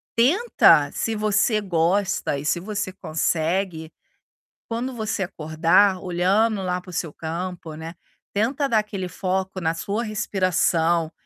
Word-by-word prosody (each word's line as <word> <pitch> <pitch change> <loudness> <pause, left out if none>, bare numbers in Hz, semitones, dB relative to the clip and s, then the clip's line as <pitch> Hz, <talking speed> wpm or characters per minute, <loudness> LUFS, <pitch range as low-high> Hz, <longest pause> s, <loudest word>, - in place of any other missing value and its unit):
Tenta, 335 - +4
se 225 - -2
você 215 +1 +2
gosta 185 -3 0
e 140 - -6
se 175 - +1
você 200 +1 -3
consegue, 160 0 -1 0.8
quando 245 +3 -3
você 220 -2 -2
acordar 170 +3 +2
olhando 195 +4 +1
lá 180 0 -1
para 180 - -13
o - - -11
seu 160 -2 -3
campo, 165 0 -5
né, 160 +2 -8 0.4
tenta 255 +7 0
dar 225 -4 +3
aquele 200 -4 -3
foco 190 +1 -2
na 165 0 0
sua 200 +6 -2
respiração, 175 -6 +1
185 Hz, 135 wpm, -23 LUFS, 165-215 Hz, 0.8 s, Tenta